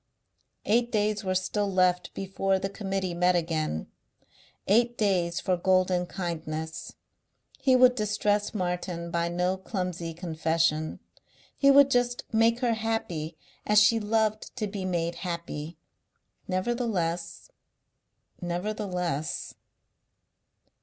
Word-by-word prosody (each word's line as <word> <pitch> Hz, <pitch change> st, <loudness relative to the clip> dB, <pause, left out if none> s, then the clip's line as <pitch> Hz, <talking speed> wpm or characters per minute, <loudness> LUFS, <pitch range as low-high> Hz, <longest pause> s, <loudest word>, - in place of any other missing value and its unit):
Eight 235 Hz, +3 st, +2 dB
days 210 Hz, -1 st, 0 dB
were 185 Hz, -1 st, -1 dB
still 200 Hz, +2 st, 0 dB
left 180 Hz, -1 st, +2 dB
before 195 Hz, 0 st, 0 dB
the 195 Hz, +1 st, -3 dB
Committee 195 Hz, -3 st, -2 dB
met 180 Hz, +1 st, +3 dB
again, 160 Hz, -, -1 dB, 0.8 s
eight 235 Hz, +4 st, +3 dB
days 180 Hz, -5 st, +1 dB
for 185 Hz, -, +1 dB
golden 185 Hz, 0 st, +2 dB
kindness. 160 Hz, -3 st, -5 dB, 0.6 s
He 260 Hz, -2 st, +4 dB
would 255 Hz, 0 st, +7 dB
distress 210 Hz, -2 st, 0 dB
Martin 180 Hz, -2 st, -3 dB
by 170 Hz, 0 st, 0 dB
no 180 Hz, +2 st, 0 dB
clumsy 180 Hz, -4 st, -4 dB
confession. 160 Hz, -2 st, 0 dB, 0.6 s
He 275 Hz, -, +4 dB
would 280 Hz, 0 st, +7 dB
just 245 Hz, -1 st, +1 dB
make 230 Hz, +2 st, +3 dB
her 240 Hz, -2 st, +2 dB
happy 180 Hz, -8 st, -3 dB, 0.3 s
as 210 Hz, -, +2 dB
she 210 Hz, +2 st, +5 dB
loved 215 Hz, 0 st, 0 dB
to 220 Hz, -, -2 dB
be 195 Hz, -2 st, -4 dB
made 170 Hz, -2 st, -1 dB
happy.... 170 Hz, -3 st, -5 dB, 0.7 s
Nevertheless. 185 Hz, -5 st, -2 dB, 0.9 s
Nevertheless.... 180 Hz, -3 st, -3 dB
185 Hz, 110 wpm, -28 LUFS, 170-215 Hz, 0.9 s, would